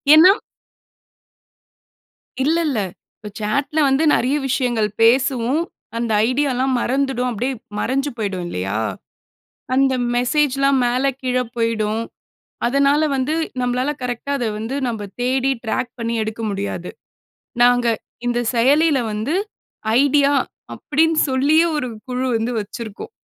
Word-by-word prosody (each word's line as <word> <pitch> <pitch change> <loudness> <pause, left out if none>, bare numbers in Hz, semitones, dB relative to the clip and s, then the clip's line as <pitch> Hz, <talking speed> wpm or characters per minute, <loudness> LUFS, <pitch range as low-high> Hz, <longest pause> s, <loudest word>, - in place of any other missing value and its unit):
ஏன்னா 360 +5 +9 2.1
இல்ல, 315 +4 +2
இல்ல. 255 -7 0 0.4
இப்ப 210 - -9
சாட்ல்ல 280 +9 0
வந்து 270 +4 +2
நிறைய 260 +4 +1
விஷயங்கள் 240 -5 +1
பேசுவோம். 255 +4 +3 0.3
அந்த 230 0 -2 0.2
ஐடியாலாம் 265 -1 +1
மறந்துடும் 260 -1 0
அப்பிடியே 245 +4 -2 0.2
மறைஞ்சு 275 +5 0
போயிடும் 195 -4 -2
இல்லயா! 95 - -3 1.0
அந்த 270 0 +3 0.2
மெசேஜ்லாம் 275 +1 +2
மேல 245 +2 +1 0.2
கீழ 255 -1 0 0.2
போயிடும். 225 -1 0 0.7
அதனால 280 +4 +3
வந்து 265 +4 0 0.3
நம்மளால 250 +3 0
கரெக்ட்‌டாக 250 +3 -2
அத 240 - -1
வந்து 225 +5 -4
நம்ம 215 -3 -4
தேடி 260 +2 +1
ட்ராக் 240 +2 -2
பண்ணி 230 0 -2
எடுக்க 220 +1 -4
முடியாது. 195 -3 -4 0.7
நாங்க 245 0 +4 0.4
இந்த 240 0 +1
செயலில 285 +6 +4
வந்து 215 +10 -2 0.7
ஐடியா 285 0 +3 0.4
அப்பிடின்னு 320 +2 +1
சொல்லியே 295 +6 +3
ஒரு 275 -4 -1 0.2
குழு 255 0 -2
வந்து 225 +2 -1
வச்சிருக்கோம். 215 +1 -7
255 Hz, 115 wpm, -20 LUFS, 230-275 Hz, 2.1 s, ஏன்னா